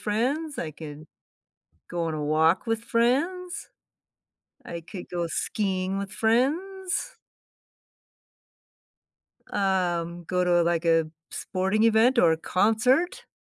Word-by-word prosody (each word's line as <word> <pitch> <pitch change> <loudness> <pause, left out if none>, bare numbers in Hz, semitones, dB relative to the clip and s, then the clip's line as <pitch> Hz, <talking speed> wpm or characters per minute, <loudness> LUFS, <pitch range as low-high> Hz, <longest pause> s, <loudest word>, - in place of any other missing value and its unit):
friends, 265 +7 -1
I 155 -2 -3
can 155 0 -9 0.8
go 175 -1 -2
on 165 -1 -2
a 150 -1 -3
walk 160 +7 +2
with 225 0 0
friends, 285 +11 0 1.0
I 170 0 -6
could 175 +2 -9
go 175 -1 -1
skiing 190 +1 -1
with 200 -1 -5
friends. 305 - 0 2.4
Um, 175 -3 0
go 180 +2 0
to, 175 -1 +4
like, 170 0 0
a 165 -1 +3 0.2
sporting 190 +4 0
event 230 +3 +4
or 170 -6 +6
a - - +1
concert. 250 - +1
195 Hz, 110 wpm, -26 LUFS, 170-245 Hz, 2.4 s, or